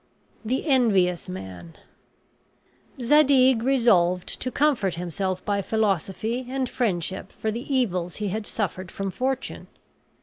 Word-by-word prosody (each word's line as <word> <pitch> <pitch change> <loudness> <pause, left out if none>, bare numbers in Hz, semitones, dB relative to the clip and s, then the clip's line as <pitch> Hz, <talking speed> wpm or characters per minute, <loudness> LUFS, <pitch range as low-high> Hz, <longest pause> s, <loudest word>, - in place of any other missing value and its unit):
THE 250 +7 -1
ENVIOUS 200 - +2
MAN 90 -3 -8 1.2
Zadig 265 -2 +5
resolved 205 -9 +2
to 255 - -1
comfort 255 - +1
himself 180 +2 -3
by 200 -1 0
philosophy 220 +4 -1
and 265 0 -1
friendship 190 -6 -2
for 220 - -3
the 240 +6 -6
evils 185 -10 0
he 210 -1 -3
had 210 +2 -3
suffered 185 -3 -3
from 195 -1 -4
fortune. 260 +4 -3
210 Hz, 115 wpm, -25 LUFS, 180-255 Hz, 1.2 s, Zadig